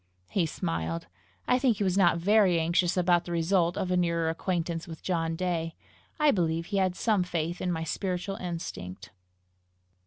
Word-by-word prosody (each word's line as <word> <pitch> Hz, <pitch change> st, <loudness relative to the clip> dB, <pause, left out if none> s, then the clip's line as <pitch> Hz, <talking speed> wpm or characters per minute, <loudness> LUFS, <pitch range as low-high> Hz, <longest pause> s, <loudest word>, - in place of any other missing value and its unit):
He 180 Hz, -5 st, +1 dB
smiled. 85 Hz, -, -3 dB, 0.4 s
I 250 Hz, -, +3 dB
think 250 Hz, -5 st, +2 dB
he 205 Hz, -, 0 dB
was 185 Hz, -2 st, +1 dB
not 175 Hz, -4 st, +4 dB
very 190 Hz, -1 st, +4 dB
anxious 170 Hz, +2 st, +1 dB
about 175 Hz, -1 st, +3 dB
the 175 Hz, -, -6 dB
result 170 Hz, +1 st, +1 dB
of 185 Hz, -, -1 dB
a -, -, +3 dB
nearer 170 Hz, -2 st, +1 dB
acquaintance 170 Hz, -1 st, -2 dB
with 160 Hz, -2 st, -9 dB
John 165 Hz, -3 st, -1 dB
Day. 165 Hz, -2 st, -2 dB, 0.4 s
I 300 Hz, -1 st, +5 dB
believe 165 Hz, -4 st, 0 dB
he 200 Hz, +2 st, -2 dB
had 185 Hz, -2 st, +1 dB
some 215 Hz, -2 st, +2 dB
faith 175 Hz, -1 st, -2 dB
in 180 Hz, -, 0 dB
my 165 Hz, -1 st, -2 dB
spiritual 185 Hz, +3 st, -3 dB
instinct. 100 Hz, -, -6 dB
175 Hz, 175 wpm, -28 LUFS, 165-185 Hz, 0.4 s, I